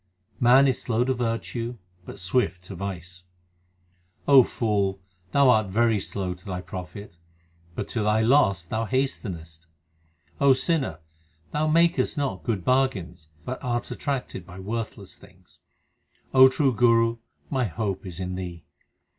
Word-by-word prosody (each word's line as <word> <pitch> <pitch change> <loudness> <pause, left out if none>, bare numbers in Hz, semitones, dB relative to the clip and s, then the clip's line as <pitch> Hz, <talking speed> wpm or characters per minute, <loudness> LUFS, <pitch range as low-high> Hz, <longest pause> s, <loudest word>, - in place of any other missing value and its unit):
Man 130 +3 +6
is 130 - 0
slow 120 0 +1
to 130 +1 +1
virtue, 120 0 -3 0.3
but - - -9
swift 90 -1 0
to 95 +1 -8
vice: 90 -1 -6 1.0
O 140 -2 +9
fool, 100 -5 -1 0.3
thou 140 -2 +5
art 110 -3 +3
very 110 +2 +2
slow 95 -1 -3
to 90 +1 -17
thy 95 -3 -4
profit, 90 0 -8 0.6
but - - -4
to 115 - -2
thy 105 +1 +2
loss 110 - +3
thou 110 +6 -2
hastenest. 85 -11 -3 0.7
O 140 -1 +6
sinner, 130 - 0 0.5
thou 155 +1 0
makest 170 +2 +2
not 140 -2 -2
good 105 -7 -2
bargains, 95 -12 0 0.2
but 130 +2 -5
art 120 -2 -2
attracted 135 -9 -3
by 90 +1 -12
worthless 110 +4 -5
things. - - -20 0.7
2 - - -3
O 130 - +11
true 130 0 +1
Guru, 115 0 +3 0.3
my 130 -3 +1
hope 100 -1 -3
is 90 -3 -7
in 90 0 -3
thee. 90 -3 -6
110 Hz, 145 wpm, -25 LUFS, 95-130 Hz, 1.0 s, O